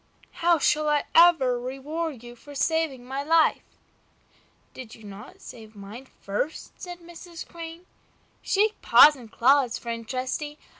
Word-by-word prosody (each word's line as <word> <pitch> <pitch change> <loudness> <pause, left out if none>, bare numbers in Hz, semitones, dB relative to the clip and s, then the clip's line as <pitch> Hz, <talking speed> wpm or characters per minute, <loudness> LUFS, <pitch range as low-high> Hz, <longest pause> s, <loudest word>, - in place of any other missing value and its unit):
"How 340 0 +4
shall 305 0 +1
I 295 -1 +1
ever 325 -8 +5
reward 270 +2 -5
you 240 0 -11
for 285 +4 -14
saving 310 -4 -1
my 265 +2 -4
life?" 320 +2 +3 1.1
"Did 245 -4 -10
you 220 - -17
not 205 +1 -12
save 220 -2 -12
mine 210 +6 -11
first?" 205 +10 -5
said 355 -1 -8
Mrs. 340 0 -11
Crane. 335 +1 -10 0.6
"Shake 425 +2 0
paws 300 0 +7
and 235 -5 -14
claws, 260 0 +3
friend 230 -1 -6
Trusty! 265 +4 -4
280 Hz, 140 wpm, -25 LUFS, 240-325 Hz, 1.1 s, paws